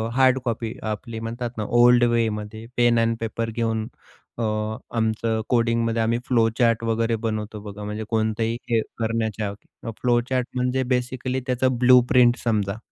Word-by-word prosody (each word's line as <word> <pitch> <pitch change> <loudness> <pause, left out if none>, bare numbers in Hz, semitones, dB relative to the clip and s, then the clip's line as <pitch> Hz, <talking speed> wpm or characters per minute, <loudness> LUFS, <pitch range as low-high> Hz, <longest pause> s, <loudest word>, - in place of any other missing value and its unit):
Hard 130 0 +4
copy 115 -1 -2 0.2
आपली 115 +2 -6
म्हणतात 120 +2 -4
ना 110 - -1 0.2
ओल्ड 120 0 +6
वेमध्ये 110 -1 -2
पेन 120 -1 +4
एंड 115 0 +1
पेपर 115 0 -3
घेऊन 110 -1 -1 0.5
अ, 115 - -2 0.5
आमचं 110 0 0
कोडिंगमध्ये 115 -1 +1
आम्ही 115 +1 +1
फ्लोचार्ट 115 -1 +2
वगैरे 115 0 0
बनवतो 110 -1 -3
बघा, 105 0 -8
म्हणजे 105 +1 -4
कोणतंही 110 +1 0
हे 115 -1 +3 0.2
करण्याच्या. 110 -2 -1 0.5
फ्लोचार्ट 125 +1 +1
म्हणजे 125 +1 0
बेसिकली 125 +1 -2
त्याचं 130 -1 +1
ब्लू 125 0 +7
प्रिंट 125 -1 +5
समजा. 105 -3 0
115 Hz, 140 wpm, -23 LUFS, 110-120 Hz, 0.5 s, ब्लू